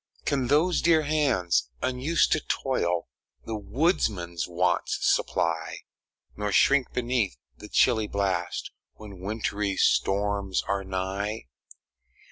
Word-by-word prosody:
Can 135 -3 0
those 160 +6 +3
dear 160 -2 +4
hands, 130 - +1
unused 140 +6 +1
to 155 - +3
toil, 90 - -1 0.4
The 110 - -4
woodman's 105 - -1
wants 90 0 0
supply, 80 0 0 0.5
Nor 105 0 -2
shrink 135 +4 +4
beneath 120 - -1 0.2
the - - -10
chilly 110 -1 +3
blast 95 -4 -2 0.2
When 100 -4 -11
wintry 105 0 -2
storms 100 -1 +1
are 100 0 -2
nigh? 95 - -3
100 Hz, 105 wpm, -26 LUFS, 90-130 Hz, 0.5 s, dear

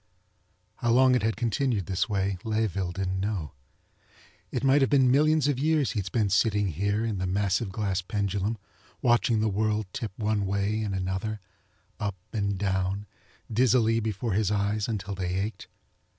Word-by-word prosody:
How 120 - -1
long 130 +2 +5
it 125 - +3
had 110 0 0
continued 115 -3 0
this 95 +3 -1
way 100 -2 -1
Layeville 105 -5 -1
didn't 95 0 -2
know. 95 -7 -2 1.0
It - - -2
might 135 +1 +5
have 135 - +3
been 130 -3 +4
millions 155 +1 +4
of 140 -3 0
years 155 -1 +2
he'd 100 -4 -2
spent 105 -1 0
sitting 105 0 +2
here 100 +6 0
in 105 -4 -2
the 95 - -1
massive 100 +2 0
glass 100 -2 -1
pendulum 100 +2 -1 0.5
watching 120 -2 +3
the 110 - +2
world 105 +1 0
tip 115 -6 -4
one 105 -2 0
way 100 +2 0
and 100 -3 -2
another, 95 +3 -2 0.6
up 100 -2 -2 0.2
and 100 -3 -1
down, 95 +1 -1 0.5
dizzily 115 -1 +3
before 110 0 -2
his 105 0 +1
eyes 105 0 0
until 105 -3 -3
they 90 -1 -2
ached. 100 +4 -3
105 Hz, 165 wpm, -27 LUFS, 95-115 Hz, 1.0 s, long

